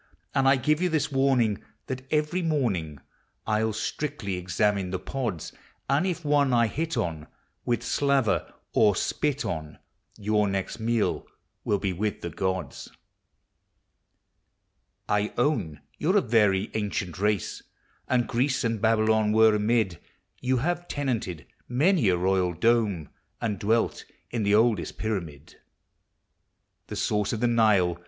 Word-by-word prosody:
And 135 -1 +2
I 135 - +6
give 150 +5 +1
you 180 - +2
this 155 -2 0
warning, 130 -6 +2 0.2
That, 130 0 -6
every 155 +4 +1
morning, 115 - -1 0.5
I'll 110 0 +1
strictly 110 -2 -3
examine 90 +2 0
the 95 - -2
pods; 115 - -4 0.3
And 145 +7 +2
if 175 -3 -3
one 145 -3 +3
I 120 -1 +4
hit 160 +8 -2
on, 80 -3 -2 0.4
With 120 - 0
slaver 140 -6 +1 0.2
or 105 -3 +4
spit 145 +8 -1
on, 80 -2 -4 0.4
Your 105 0 +1
next 95 +3 -3
meal 115 -1 0 0.4
will 105 - +1
be 95 -1 -2
with 105 +3 -2
the 85 - -5
gods. 95 +2 -3 2.2
I 105 +1 0
own 120 - 0 0.2
you 160 - +2
're 205 - +4
a - - +5
very 105 - +2
ancient 100 -5 -3
race, 105 -2 0 0.5
And 125 -2 +1
Greece 130 +3 0
and 115 -3 -1
Babylon 110 -1 +3
were 110 0 +6
amid; 105 -4 +1 0.4
You 130 0 +1
have 175 0 -1
tenanted 115 - -3 0.2
many 145 - +3
a 90 - +2
royal 90 -1 +1
dome, 105 - +1 0.3
And 105 -4 -2
dwelt 110 +4 0 0.3
in 120 - -1
the 100 0 +3
oldest 110 -4 +2
pyramid; 85 -9 -4 1.3
The - - -6
source 105 -1 0
of 110 - -2
the 120 - +1
Nile! 105 -7 +3
110 Hz, 140 wpm, -26 LUFS, 95-130 Hz, 2.2 s, I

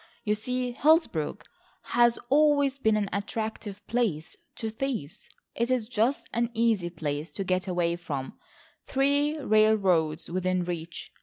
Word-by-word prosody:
You 210 - +1
see 250 +3 -2
Hillsborough 285 - +2 0.5
has 240 -1 +3
always 285 -1 +3
been 220 -4 +3
an 205 -1 0
attractive 205 -1 -4
place 210 -10 -1 0.2
to 220 -1 -4
thieves. 225 - -4 0.2
It 235 +1 -1
is 250 -4 0
such 235 +5 +2
an 235 0 +1
easy 220 -6 +2
place 155 -2 -4
to 195 - -3
get 185 0 -1
away 175 -2 0
from,—three 270 - -2
railroads 200 - +2
within 185 +1 0
reach. 170 -1 -6
215 Hz, 130 wpm, -27 LUFS, 175-245 Hz, 0.5 s, has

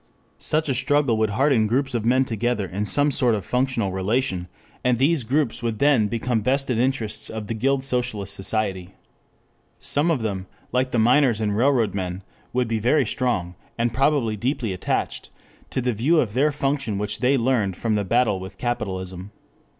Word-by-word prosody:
Such 155 +1 +1
a 135 - +1
struggle 135 -1 +2
would 110 -1 +1
harden 125 0 +2
groups 130 +4 0
of 115 -2 -1
men 130 +2 +3
together 120 -2 -1
in 100 +3 -3
some 145 +9 +3
sort 125 -4 +3
of 100 -4 -5
functional 125 -5 0
relation, 95 -1 -1 0.4
and 125 -1 +2
these 140 +2 +2
groups 135 +1 0
would 115 -2 -2
then 135 -5 +3
become 115 +2 -1
the 105 - -8
vested 130 -2 +1
interests 125 -4 -1
of 110 -1 -5
the 115 - -3
guild 130 +4 0
socialist 120 -7 -1
society. 95 -2 -2 0.8
Some 150 +4 +2
of 145 -9 0
them, 95 -3 -3 0.2
like 130 +1 +1
the 125 - -1
miners 120 0 +4
and 105 -2 0
railroad 120 -3 +2
men, 95 -1 -4 0.3
would 125 -1 0
be 115 -1 -1
very 130 +5 +2
strong, 110 -8 -1 0.2
and 115 0 0
probably 135 -4 +1
deeply 120 -1 -2
attached 90 - -2 0.4
to - - -2
the 125 0 0
view 140 +10 +2
of 110 -8 0
their 145 +5 +2
function 135 -6 -1
which 105 +1 -3
they 130 +2 +3
learned 115 -6 +1
from 115 -2 -1
the 105 -1 +1
battle 115 -1 +1
with 95 +1 -9
capitalism. 95 -5 -4
120 Hz, 180 wpm, -23 LUFS, 105-130 Hz, 0.8 s, miners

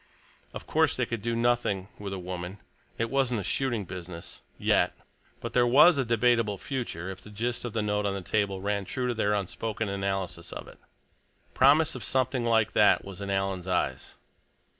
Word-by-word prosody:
Of - - -8
course - - +2
they - - 0
could 115 -3 -4
do 115 +1 -1
nothing 115 -5 +1
with 100 -1 -5
a 95 - -3
woman; 90 +1 -5 0.4
it 115 0 -1
wasn't 130 -4 +1
a - - -6
shooting 120 -5 -1
business—yet. 85 -1 -2 0.4
But 115 - -6
there 120 -1 +4
was 145 +5 +7
a - - +3
debatable 115 -3 +2
future, 95 - -4
if 95 0 -10
the - - -13
gist 120 +4 -3
of 120 - -4
the 110 - 0
note 105 0 0
on 100 - -1
the 100 - -4
table 100 0 0
ran 100 0 -1
true 125 +3 -2
to 120 - 0
their 105 -2 +1
unspoken 105 +2 -3
analysis 95 -3 -3
of - - -7
it. - - -14 0.7
Promise 145 +4 +5
of 130 - -6
something 130 +1 0
like 115 -2 +3
that - - +4
was 100 -1 -9
in 100 - -4
Alan's 95 -2 -1
eyes. 90 - -1
105 Hz, 185 wpm, -28 LUFS, 95-120 Hz, 0.7 s, was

